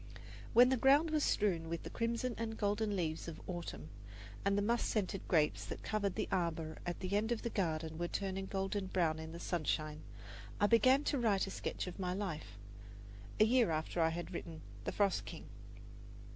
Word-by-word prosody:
When 245 +2 +8
the 260 - +2
ground 285 +6 +5
was 305 -2 +2
strewn 170 -6 +1
with 170 0 -3
the - - -7
crimson 235 +2 -1
and 225 -1 -3
golden 205 0 0
leaves 165 -3 -2
of 160 -2 -6
autumn, 175 -3 -5 0.5
and 200 0 +2
the 205 - +2
musk 235 +3 +1
scented 195 -3 -1
grapes 155 -4 +2
that - - -6
covered 205 -3 -1
the - - -1
arbour 165 -3 -1
at 175 - -3
the 190 +1 -1
end 220 +3 +1
of 235 - -1
the 235 - -2
garden 160 -4 -1
were 175 - 0
turning 190 +1 -3
golden 195 0 -2
brown 165 -4 +1
in 160 0 -7
the 170 - -7
sunshine, 155 -3 -1 0.6
I 205 - +4
began 255 +6 +5
to 285 - 0
write 210 -5 +2
a 195 - -6
sketch - - -3
of 180 +1 -7
my 180 -1 -1
life 155 - -4 0.8
a 215 - +8
year 240 -2 +4
after 160 +2 -1
I 160 - +4
had 170 +1 -5
written 160 -2 -6 0.2
"The - - -1
Frost 200 -2 +1
King." - - -8
195 Hz, 195 wpm, -35 LUFS, 165-220 Hz, 0.8 s, When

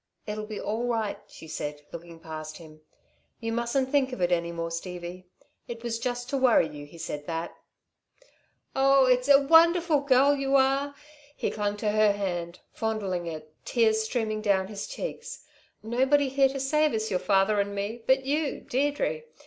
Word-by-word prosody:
"It'll 215 0 -5
be 215 -2 -6
all 225 +3 -2
right," 225 -4 -1
she 160 - -13
said, 150 -1 -5
looking 170 0 -10
past 155 -1 -7
him. 155 -2 -14 0.6
"You 225 -1 -3
mustn't 235 +3 0
think 275 -3 +2
of 250 - -6
it 175 0 +1
any 170 -1 +1
more, 165 0 -4
Stevie. 180 +1 -6 0.4
It 230 0 -7
was 230 -1 -2
just 245 0 -3
to 280 - +1
worry 250 -10 +4
you, 145 -1 -10
he 170 - -14
said 145 -2 -6
that." 165 0 -4 1.2
"Oh, 270 0 +5
it's 250 +1 +2
a 280 -1 +9
wonderful 330 +2 +5
girl 280 +1 +4
you 275 0 0
are!" 275 +1 +2 0.4
He - - -2
clung 205 -1 -2
to 210 0 0
her 215 -1 +4
hand, 175 -4 -4
fondling 200 -6 -2
it, 155 -1 -7
tears 220 -2 +2
streaming 220 -1 -2
down 195 -2 +1
his 205 -1 -6
cheeks. - - -6 0.4
"Nobody 265 +5 +2
here 270 0 +3
to 270 +1 -5
save 300 +3 +2
us, 220 0 -2
your 185 - +1
father 200 +2 +2
and 200 0 -1
me, 205 +4 -4
but 265 0 +3
you, 290 +1 -1
Deirdre! 290 - -1
220 Hz, 175 wpm, -27 LUFS, 180-270 Hz, 1.2 s, a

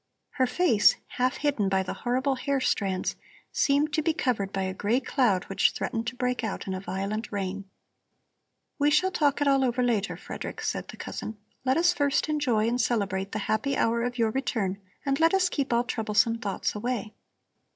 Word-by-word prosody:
Her 260 -3 +1
face, 250 - +4
half 255 +2 0
hidden 275 -10 +1
by 190 0 +2
the 185 - -4
horrible 260 +3 0
hair 275 +1 -1
strands, 195 -7 0 0.4
seemed 290 +2 +2
to 310 - +2
be 315 +1 +1
covered 240 - 0
by 195 -1 -1
a 190 0 -2
gray 210 +6 +1
cloud 245 -8 +1
which 195 - +2
threatened 230 0 -3
to 255 - -3
break 250 0 -1
out 220 - -3
in 190 - -3
a 185 - -3
violent 195 +4 -3
rain. 195 -1 -4 1.1
"We 290 +1 +4
shall 365 +6 +3
talk 290 -5 +1
it 290 - +3
all 275 -1 +4
over 250 0 +1
later, 220 -5 0
Frederick," - - -7
said - - -2
the - - -10
cousin. 220 - -6 0.3
"Let 260 +2 +3
us 345 +1 +4
first 285 0 +1
enjoy 250 -8 +1
and 245 +2 +1
celebrate 200 -4 -1
the - - -2
happy 265 +6 0
hour 230 +1 +2
of 245 +1 -2
your 225 -2 +2
return 215 -7 -1 0.3
and 275 0 +1
let 330 +3 +4
us 370 -1 +3
keep 280 -5 -2
all 235 0 +3
troublesome 230 -1 +1
thoughts 200 -3 -2
away." 215 -1 -3
240 Hz, 195 wpm, -27 LUFS, 205-275 Hz, 1.1 s, face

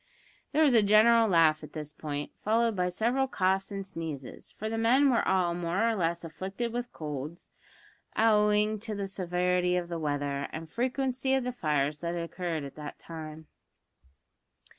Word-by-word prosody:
There 310 +2 +3
was 285 -4 +5
a 230 - +6
general 220 +3 +6
laugh 160 -4 +4
at 150 - -10
this 150 -1 -6
point, 145 -1 -5
followed 225 +1 +2
by 180 -1 +1
several 240 +8 +1
coughs 190 -4 0
and 195 -1 -4
sneezes, 160 -8 -7
for 215 - -6
the 225 - -2
men 260 +5 +4
were 240 - +3
all 185 -2 +2
more 175 +5 0
or 230 - +2
less 170 -3 -1
afflicted 195 +8 -4
with 245 0 -3
colds, 150 +2 -6 0.7
owing 210 -1 +3
to 215 0 -5
the 200 -1 -3
severity 180 -1 0
of 175 -1 -3
the 170 -1 -3
weather 145 -2 -2
and 160 0 -6
the - - -29
frequency 260 +2 0
of 265 - 0
the 250 - -2
fires 150 - 0
that 170 0 -3
had 170 - -2
occurred 170 -2 -3
at 140 - -7
that 150 -1 -7
time. 160 -1 -9
180 Hz, 180 wpm, -29 LUFS, 160-225 Hz, 0.7 s, a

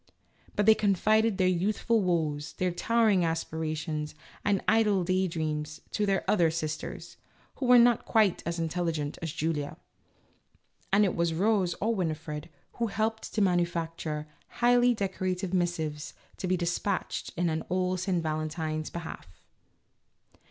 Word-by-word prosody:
But 205 - +2
they 220 - +8
confided 215 +1 +2
their 185 - +3
youthful 205 +5 +1
woes, 160 -5 -1
their 185 -1 -1
towering 215 +1 +2
aspirations, 155 -2 -2 0.3
and 200 -2 +1
idle 210 -4 +3
day 185 +1 +1
dreams 155 -2 -3
to 210 -1 0
their 195 -1 +1
other 175 -6 +4
sisters, 160 -1 -5 0.4
who 260 - -2
were 250 0 +8
not 240 0 +5
quite 215 -5 +3
as 170 0 -3
intelligent 165 -3 -2
as 165 -2 -3
Julia, 150 -2 -2 1.1
and 205 +2 +5
it 190 - 0
was 170 -1 0
Rose 190 -1 +2
or 225 +3 +1
Wini 165 -6 -1
fred 150 0 -7 0.3
who 235 - 0
helped 220 +2 -2
to 210 - +3
manufacture 165 -4 -1 0.2
highly 245 0 +3
decorative 185 -2 -2
missives 160 -5 -1 0.2
to 185 - -3
be 185 0 +2
dispatched 175 +2 -2
in 160 -2 0
old 185 0 0
St. 180 -2 0
Valentine's 155 0 -2
behalf. 170 - -7
175 Hz, 140 wpm, -29 LUFS, 160-205 Hz, 1.1 s, they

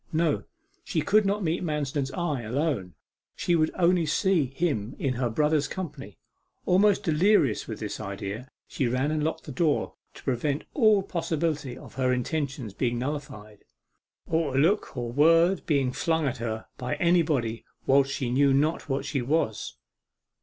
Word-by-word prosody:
No; 160 -2 +1 0.4
she 160 - -1
could 210 +4 +3
not 205 +1 0
meet 170 +2 -1
Manston's 145 -4 -1
eye 150 -6 -1
alone, 115 - -2 0.4
she 175 - +1
would 155 -1 +3
only 175 -2 +3
see 170 0 +2
him 135 -5 -2
in 135 -2 -1
her 125 -1 -1
brother's 150 +4 +1
company. 145 - -7 0.5
Almost 195 +2 +4
delirious 160 - +3
with 110 -2 -6
this 105 -2 -5
idea, 100 +4 -5 0.2
she 130 - -1
ran 130 +5 0
and 155 -1 0
locked 160 - -2
the 150 - -8
door 150 +2 0 0.2
to - - -13
prevent 140 +3 -1
all 215 -7 +4
possibility 160 -7 -2
of - - -12
her 130 -1 +1
intentions 130 -3 -2
being 120 +1 -1
nullified, 125 -6 -6 0.6
or 160 -5 0
a - - +3
look 170 -1 +1
or 120 -1 -3
word 165 +8 +4
being 140 -5 +2
flung 160 +3 0
at 130 -2 -1
her 110 -2 -4
by 125 0 -2
anybody 155 -10 +1 0.2
whilst 135 0 +4
she 130 -3 -2
knew 140 +2 +4
not 150 +3 0
what 135 +1 -1
she 140 -1 -1
was. 125 -4 -1
145 Hz, 160 wpm, -27 LUFS, 125-165 Hz, 0.6 s, Almost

